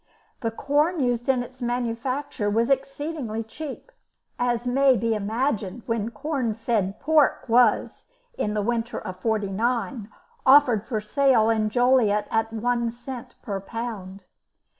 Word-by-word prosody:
The 230 - -1
corn 295 +9 +1
used 245 -2 0
in 255 -2 +3
its 255 +1 -14
manufacture 240 0 -2
was 230 +5 +1
exceedingly 275 -4 -2
cheap, 300 - -8 0.5
as 240 -1 0
may 260 +1 +4
be 230 +2 0
imagined 220 0 -2
when 230 -2 -1
corn 265 -4 -2
fed 220 -3 -1
pork 300 -2 +2
was, 235 -1 +2 0.3
in 210 - -2
the 210 - 0
winter 235 +1 -1
of 185 -3 -7
'49, 220 +2 -1 0.3
offered 260 -6 +5
for 220 -4 -2
sale 230 0 +3
in 215 -1 +1
Joliet 240 -3 +3
at 225 0 0
one 235 +1 0
cent 240 +1 -8
per 200 -2 -3
pound. 195 -3 -6
235 Hz, 135 wpm, -25 LUFS, 215-260 Hz, 0.5 s, offered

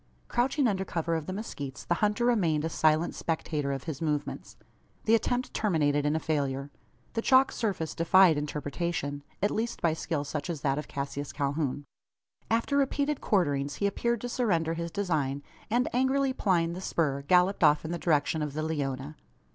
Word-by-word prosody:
Crouching 260 +3 +1
under 190 -3 0
cover 170 -2 -2
of 160 -2 -2
the - - -3
mezquites, 145 - -6
the - - +1
hunter 210 +3 +2
remained 170 -11 +2
a - - -1
silent 160 +1 +2
spectator 155 -3 -2
of 135 -1 -3
his 160 -4 -5
movements. 150 -2 -3 0.5
The 225 - +3
attempt 245 +2 +1
terminated 145 -8 +1
in 150 - +1
a - - +1
failure. 140 -3 -2 0.4
The 225 - 0
chalk 260 +2 +5
surface 190 -9 -2
defied 175 0 +5
interpretation 145 0 -3 0.2
at 205 - +3
least 230 +2 -2
by 165 -2 +2
skill 160 -2 -2
such 145 +2 -4
as 160 -4 -3
that 140 -1 +1
of 150 - -6
Cassius 140 0 -4
Calhoun. 145 -1 -2 0.6
After 230 +5 +1
repeated 285 +1 +1
quarterings 145 -8 +1
he 200 - -1
appeared 235 +3 0
to 245 - -4
surrender 170 -10 +1
his 170 0 -3
design; 155 -8 -1 0.3
and, 240 +3 +2
angrily 265 +2 +2
plying 170 -8 +1
the 180 - -6
spur, 145 -7 0
galloped 180 +6 +3
off 150 +1 +5
in 160 - -4
the 175 - -3
direction 155 -1 +1
of 150 -2 -3
the 155 +1 -2
Leona. 145 -2 -3
165 Hz, 180 wpm, -29 LUFS, 145-205 Hz, 0.6 s, chalk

